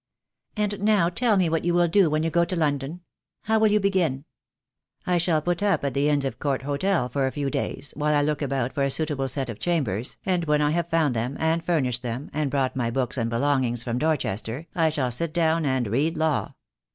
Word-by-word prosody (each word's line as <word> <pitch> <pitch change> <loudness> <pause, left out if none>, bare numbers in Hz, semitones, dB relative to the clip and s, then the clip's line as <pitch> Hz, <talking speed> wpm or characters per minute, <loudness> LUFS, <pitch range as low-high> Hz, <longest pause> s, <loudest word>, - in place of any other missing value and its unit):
And 210 -1 -1
now 205 -5 +3
tell 225 +3 +1
me 185 -2 +3
what 165 0 0
you 175 0 +1
will 175 0 +4
do 180 0 +4
when 155 +1 0
you 165 - 0
go 170 +1 +3
to 170 +2 -2
Lon 150 -4 +1
don. 150 +7 -7 0.4
How 220 +1 +2
will 220 - +5
you 210 +1 +3
begin?" 180 -9 0 0.8
"I 180 -1 +2
shall 160 -3 +1
put 175 +1 -1
up 200 -7 +1
at 140 - -1
the 140 +3 +2
Inns 145 -2 +1
of 135 - -4
Court 140 -3 -1
Hotel 145 +1 0
for 135 +2 0
a - - -2
few 140 -1 -2
days 140 - -3
while 150 +1 +1
I 145 - +3
look 150 0 -1
about 135 -3 -1
for 140 - -2
a 140 - +2
suitable 145 -2 0
set 135 +1 -2
of 115 -3 -7
chambers, 125 - -1
and 180 -3 0
when 150 -1 +2
I 150 0 +2
have 170 +1 -1
found 160 -6 +2
them 120 +5 -2
and 165 +1 +1
furnished 130 -8 0
them, 125 +3 -5
and 150 -2 0
brought 135 -2 0
my 120 -3 0
books 125 0 -2
and 115 -3 -1
belongings 120 -1 0
from 120 0 -2
Dorchester, 140 -3 -1
I 165 -3 +2
shall 135 -5 -1
sit 155 +7 -2
down 165 -2 +2
and 130 -2 +1
read 145 +10 0
law. 160 -2 0
150 Hz, 235 wpm, -25 LUFS, 130-170 Hz, 0.8 s, will